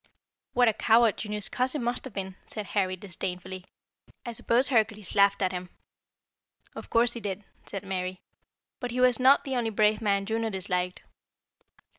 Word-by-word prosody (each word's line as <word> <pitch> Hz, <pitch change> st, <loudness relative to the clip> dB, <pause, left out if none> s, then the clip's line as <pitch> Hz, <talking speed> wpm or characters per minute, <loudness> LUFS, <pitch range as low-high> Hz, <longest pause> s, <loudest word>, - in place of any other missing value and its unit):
"What 245 Hz, 0 st, +4 dB
a 225 Hz, -, +4 dB
coward 225 Hz, 0 st, +4 dB
Juno's 210 Hz, -1 st, -2 dB
cousin 255 Hz, +2 st, -1 dB
must 240 Hz, +2 st, -1 dB
have 260 Hz, -, -8 dB
been!" 190 Hz, -1 st, -4 dB
said 215 Hz, -2 st, -5 dB
Harry 185 Hz, -3 st, +1 dB
disdainfully. 185 Hz, 0 st, -6 dB, 0.6 s
"I 240 Hz, -, -3 dB
suppose 235 Hz, +3 st, +1 dB
Hercules 215 Hz, -5 st, +1 dB
laughed 200 Hz, -1 st, +4 dB
at 185 Hz, -, +1 dB
him." 180 Hz, -1 st, -5 dB, 1.0 s
"Of -, -, -9 dB
course 235 Hz, +1 st, +4 dB
he 235 Hz, -, -5 dB
did," 205 Hz, -1 st, -4 dB, 0.2 s
said 195 Hz, -, -6 dB
Mary. 185 Hz, -1 st, -3 dB, 0.6 s
"But 245 Hz, -, -3 dB
he 245 Hz, +1 st, -3 dB
was 250 Hz, 0 st, +4 dB
not 265 Hz, +2 st, +6 dB
the 265 Hz, -2 st, -3 dB
only 235 Hz, -2 st, 0 dB
brave 215 Hz, +1 st, +2 dB
man 200 Hz, -2 st, +1 dB
Juno 225 Hz, +1 st, -1 dB
disliked. 180 Hz, -2 st, -2 dB
210 Hz, 165 wpm, -28 LUFS, 190-235 Hz, 1.0 s, not